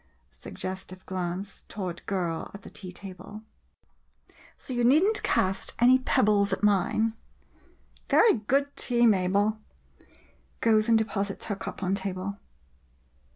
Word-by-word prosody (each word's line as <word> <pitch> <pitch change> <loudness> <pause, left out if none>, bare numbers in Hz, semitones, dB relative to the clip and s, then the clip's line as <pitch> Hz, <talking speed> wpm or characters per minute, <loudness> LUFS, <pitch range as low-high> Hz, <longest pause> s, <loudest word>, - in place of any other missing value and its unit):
[Suggestive 185 - -8
glance 185 +1 -5
toward 185 -4 -5
girl 175 -4 -2
at 200 - -11
the - - -11
tea 185 -3 -7
table 195 +3 -10 0.6
.] - - -28
So 260 - -8
you 240 -1 0
need 280 +8 +6
n't 420 +1 +2
cast 190 +1 0
any 255 +2 +6
pebbles 205 -5 +2
at 190 - -2
mine. 210 +2 +2 1.0
Very 460 - +6
good 275 +6 0
tea, 240 -1 +2
Mabel. 205 +1 +2 1.0
[Goes 220 0 +3
and 225 - +6
deposits 200 -2 -2
her 205 - -2
cup 210 -1 -7
on 185 +1 0
table.' 195 0 -3
200 Hz, 130 wpm, -27 LUFS, 185-225 Hz, 1.0 s, need